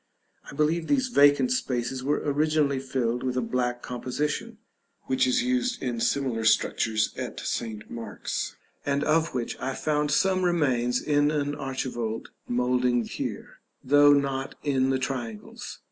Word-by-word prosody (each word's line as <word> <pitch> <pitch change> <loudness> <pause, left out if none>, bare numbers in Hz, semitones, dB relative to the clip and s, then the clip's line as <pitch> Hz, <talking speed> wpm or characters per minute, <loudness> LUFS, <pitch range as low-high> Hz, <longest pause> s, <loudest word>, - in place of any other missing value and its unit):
I - - -10
believe 160 +3 +1
these 260 -2 +2
vacant 145 - +5
spaces 130 - -1
were 145 +2 0
originally 150 -1 +2
filled 125 -2 -1
with 130 -1 -2
a - - +2
black 125 0 -1
composition, 145 - -3 0.5
which 260 0 +1
is 255 -1 +2
used 250 -1 0
in 120 -3 -3
similar 125 -2 0
sculptures 110 0 +2
at - - -5
St. 110 -2 -4
Mark's, 115 -1 -4 0.3
and 140 0 0
of 160 -1 +1
which 120 -2 -2
I 135 0 -3
found 150 -1 0
some 185 +5 +2
remains 130 -8 +2
in 145 -1 +2
an 145 -1 -1
archivolt 130 -5 -4 0.2
moulding 125 0 +1
here, - - -6 0.2
though 145 +2 +6
not 135 -1 +1
in 135 -2 +2
the 135 - +2
triangles. 125 -5 -5
135 Hz, 145 wpm, -27 LUFS, 125-150 Hz, 0.5 s, though